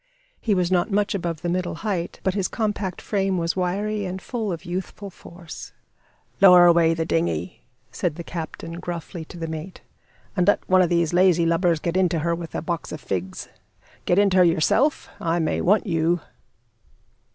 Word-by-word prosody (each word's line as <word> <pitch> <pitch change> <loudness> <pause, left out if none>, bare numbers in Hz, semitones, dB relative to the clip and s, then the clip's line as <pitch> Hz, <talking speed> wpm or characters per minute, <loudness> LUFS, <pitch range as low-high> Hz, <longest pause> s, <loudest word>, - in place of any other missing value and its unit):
He 215 -3 +1
was 180 -1 0
not 180 +2 +2
much 205 +1 +1
above 170 -5 -3
the - - -1
middle 180 -1 -1
height; 185 -5 -2
but 190 - +1
his 195 -2 0
compact 205 -4 -2
frame 195 -2 -1
was 170 -1 -1
wiry 200 +3 -1
and 185 0 -4
full 220 -1 -3
of 165 -2 -6
youthful 190 +3 -5
force. 170 -1 -11 0.7
"Lower 180 -2 +9
away 170 -1 +5
the 165 0 -1
dinghy," 85 - -1 0.3
said 155 +4 -2
the 170 - -7
captain, 165 0 -6
gruffly, 170 0 -6
to 175 - -11
the 165 - -4
mate, 160 +3 -7 0.5
"and 180 -2 +1
let 205 - +2
one 185 0 +5
of 175 - +2
these 170 -1 +1
lazy 175 -2 +4
lubbers 170 0 +2
get 170 +2 -2
into 180 -3 +2
her 170 +2 0
with 170 -1 -6
a - - -3
box 170 -1 -3
of - - -5
figs. 95 -7 -4 0.6
Get 175 - +2
into 200 -2 +4
her 180 - +7
yourself? 175 - +2
I 165 0 0
may 160 -2 0
want 205 +4 +3
you." 170 -1 +1
175 Hz, 185 wpm, -23 LUFS, 165-190 Hz, 0.7 s, Lower